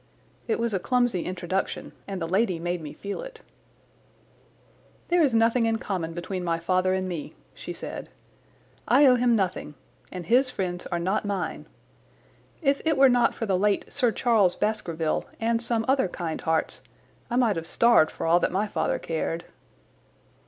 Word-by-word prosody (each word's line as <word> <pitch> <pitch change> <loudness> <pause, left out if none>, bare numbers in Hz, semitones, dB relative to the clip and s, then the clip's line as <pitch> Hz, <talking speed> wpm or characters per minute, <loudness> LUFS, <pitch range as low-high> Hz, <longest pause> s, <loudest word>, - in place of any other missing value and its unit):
It 225 - +1
was 235 -1 -1
a 190 - +1
clumsy 245 -4 +1
introduction, 185 +1 -3 0.2
and 195 -2 -4
the 165 - -3
lady 190 0 +1
made 175 +1 -3
me 150 -2 -7
feel 200 0 -6
it. - - -10 1.7
"There 350 0 +4
is 275 -7 +3
nothing 230 +1 +3
in 225 0 +1
common 180 -7 -3
between 180 +2 -4
my 170 -1 0
father 185 +2 +1
and 185 0 -2
me," 170 -5 -6 0.2
she - - -8
said. - - -7 0.8
"I 290 - +6
owe 260 - +7
him 245 -1 +3
nothing, 185 -7 -2 0.4
and 180 -2 -6
his 255 +7 +3
friends 180 -6 -4
are 175 - -2
not 185 +6 0
mine. 200 -3 -3 1.0
If 275 -1 +2
it 320 -2 +1
were 270 0 +7
not 245 -2 +3
for 225 - -3
the 190 -3 +1
late 205 0 0
Sir 250 -5 +2
Charles 215 -7 +3
Baskerville 170 -7 -1
and 230 0 +1
some 230 -1 0
other 265 -5 +3
kind 170 -2 -4
hearts 160 -1 0 0.5
I 240 - -2
might 240 -4 +3
have 165 0 -4
starved 235 -6 +4
for - - -6
all 170 +2 +4
that - - 0
my 195 +3 0
father - - -1
cared." 165 +1 -3
200 Hz, 175 wpm, -26 LUFS, 175-235 Hz, 1.7 s, owe